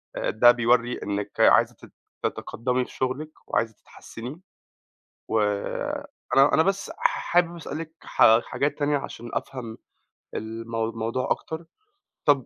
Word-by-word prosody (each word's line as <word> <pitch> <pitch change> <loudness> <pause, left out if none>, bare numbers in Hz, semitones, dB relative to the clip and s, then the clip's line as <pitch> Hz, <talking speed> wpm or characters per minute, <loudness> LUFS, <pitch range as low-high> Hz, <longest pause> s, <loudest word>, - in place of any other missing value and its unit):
آآ - - -1
ده 120 +3 +7
بيورّي 120 0 +2
إنِك 100 0 -4
عايزة - - +5
تت - - -16 0.3
تتقدِّمي 125 +2 -1
في - - -14
شغلِك 135 +4 -2 0.2
وعايزة 110 -1 0
تتحسِّني، 125 - -10 0.9
وأنا 110 +6 +1
أنا 160 - +5
بس 195 0 0
ح - - 0
حابب 175 0 +3
أسألِك 160 0 -6
حا 115 +1 +5
حاجات 145 +1 -1
تانية 145 0 +2
عشان 120 -3 -7
أفهَم 115 -4 -4 0.6
المو 115 0 -3
الموضوع 115 +3 -2
أكتر. 160 +1 -2 0.6
طَب 140 -3 +4
125 Hz, 125 wpm, -25 LUFS, 115-150 Hz, 0.9 s, ده